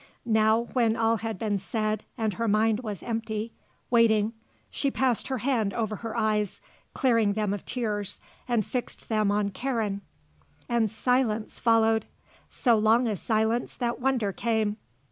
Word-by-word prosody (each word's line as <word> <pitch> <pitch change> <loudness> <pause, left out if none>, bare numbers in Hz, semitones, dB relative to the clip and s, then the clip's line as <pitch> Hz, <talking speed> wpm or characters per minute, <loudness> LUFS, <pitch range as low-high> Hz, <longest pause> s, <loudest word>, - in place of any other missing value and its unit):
Now, 220 0 +3
when 230 -3 +3
all 225 0 +2
had 225 -1 -4
been 205 0 -1
said 215 +1 -2
and 220 -3 0
her 230 +5 -2
mind 215 +1 +3
was 215 -5 -6
empty, 225 -1 -3 0.4
waiting, 225 -2 +4 0.4
she 280 - 0
passed 255 -3 +1
her 265 - -1
hand 235 -5 0
over 220 -3 -1
her 230 +2 -5
eyes, 215 -3 0 0.4
clearing 230 -6 +3
them 210 -1 0
of 205 - -5
tears, 210 -5 -2 0.3
and 235 -4 +1
fixed 250 -2 -4
them 215 -2 +2
on 205 0 +1
Karen. 220 -3 -2 0.7
And 235 -2 +2
silence 225 -1 0
followed. 225 -2 +3 0.4
So 235 -3 +2
long 225 +3 +4
a 215 - 0
silence 220 +4 0
that 240 0 -2
wonder 250 -6 +1
came. 220 0 0
220 Hz, 150 wpm, -27 LUFS, 215-235 Hz, 0.7 s, waiting